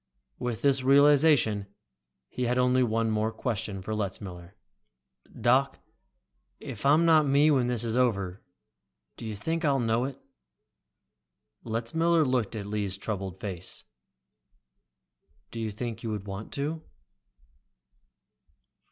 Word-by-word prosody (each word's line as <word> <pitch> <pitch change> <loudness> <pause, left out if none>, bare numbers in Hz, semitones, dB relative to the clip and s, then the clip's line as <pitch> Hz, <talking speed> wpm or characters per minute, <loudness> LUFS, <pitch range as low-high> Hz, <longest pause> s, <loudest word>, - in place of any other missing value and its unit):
With 120 -2 -3
this 135 -2 +3
realization, 140 -6 +4 0.6
he 125 - -3
had 125 +1 +1
only 125 0 +3
one 115 -2 +1
more 110 +1 0
question 105 -4 -4
for 110 - -4
Letzmiller. 95 -3 -5 0.8
"Doc, 130 +4 +2 0.8
if 115 +4 -4
I'm 155 +4 +5
not 155 -3 +5
me 145 +3 +4
when 130 -4 +2
this 120 -2 0
is 115 -1 -1
over, 100 -7 0 0.7
do 115 - -8
you 110 - -4
think 160 +11 -3
I'll 140 -3 +2
know 115 +1 +1
it?" 135 0 -6 1.4
Letzmiller 155 +9 +1
looked 125 -5 0
at 105 -2 -5
Lee's 100 -2 -2
troubled 95 -2 -5
face. 95 -3 -7 1.7
"Do 115 - -6
you 110 -1 -2
think 115 +2 -5
that - - -16
you - - -2
would 105 -2 -4
want 100 +1 -7
to?" 150 +3 -3
115 Hz, 125 wpm, -28 LUFS, 105-135 Hz, 1.7 s, I'm